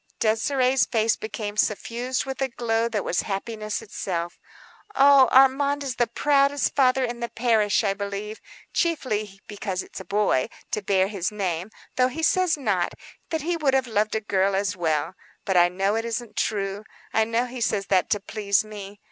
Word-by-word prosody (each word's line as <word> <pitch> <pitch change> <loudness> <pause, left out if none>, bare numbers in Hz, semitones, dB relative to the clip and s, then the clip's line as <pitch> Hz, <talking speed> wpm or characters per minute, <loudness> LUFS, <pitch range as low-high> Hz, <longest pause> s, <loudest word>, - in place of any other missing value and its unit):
Désirée's 250 +2 +2
face 225 0 +2
became 210 -1 -5
suffused 235 +5 -1
with 265 0 -5
a 270 - +2
glow 235 -2 -1
that 215 -3 -2
was 175 - +1
happiness 215 +1 -4
itself. 175 -4 -4 0.6
"Oh, 275 -1 +7
Armand 280 +2 +4
is 260 -3 -4
the 240 - +2
proudest 280 +3 +2
father 260 -1 +3
in 240 0 -5
the 235 0 -3
parish, 225 -3 +2
I 200 -2 +1
believe, 200 +1 -5 0.3
chiefly 215 - -1
because 200 -3 -4
it - - -17
is - - -6
a 190 - -9
boy, 200 -10 +1 0.2
to 210 - -1
bear 190 -1 +2
his 195 -2 -2
name; 185 -3 -3 0.3
though 255 0 +4
he 320 +6 -5
says 360 0 +3
not,—that 220 - -3
he 345 +2 0
would 280 -4 +2
have 265 -1 +2
loved 215 -2 0
a 220 - 0
girl 195 -2 +1
as 200 +1 0
well. 160 -3 -1 0.3
But 190 - 0
I 175 0 +6
know 195 +3 0
it 225 +1 -1
isn't 235 -1 -4
true. 200 -1 -2 0.3
I 220 - +4
know 230 +2 0
he 250 0 -7
says 210 -3 0
that 185 -2 +2
to 205 - +1
please 200 0 0
me. 205 -1 -9
215 Hz, 180 wpm, -24 LUFS, 200-255 Hz, 0.6 s, Oh